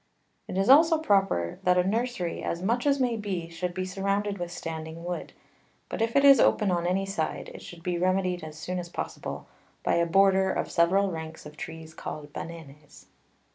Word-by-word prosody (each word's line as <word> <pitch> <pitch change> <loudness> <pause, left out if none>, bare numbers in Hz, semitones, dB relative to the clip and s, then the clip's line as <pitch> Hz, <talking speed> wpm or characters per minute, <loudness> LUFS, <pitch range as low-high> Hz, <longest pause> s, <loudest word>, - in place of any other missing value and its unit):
It - - -4
is 195 +1 +2
also 320 +4 +7
proper 195 - +1
that 180 0 +3
a 180 - +4
Nursery, 225 -5 -1
as 170 +2 -3
much 240 +7 +1
as 280 -1 +3
may 245 -3 +1
be, 190 -6 -4
should 175 +1 -4
be 185 0 -2
surrounded 200 +1 -1
with 175 0 -4
standing 160 -1 -6
Wood; 175 0 -4 0.6
but - - -4
if 225 +2 0
it 280 0 +5
is 275 -3 +9
open 210 -3 +3
on 175 -1 0
any 190 +2 +1
side, 195 -5 -3
it - - -10
should 170 -1 -11
be 180 -2 -1
remedy'd 185 -1 +1
as 155 -1 -8
soon 180 +3 -3
as 175 -1 -6
possible, - - -5 0.4
by - - +1
a 170 0 +2
Border 190 +1 +4
of - - -2
several 190 +3 +3
Ranks 160 -1 -7
of 150 0 -10
Trees 160 0 -8
called 150 -2 -7
Bananes. 150 -3 -10
180 Hz, 195 wpm, -27 LUFS, 165-200 Hz, 0.6 s, is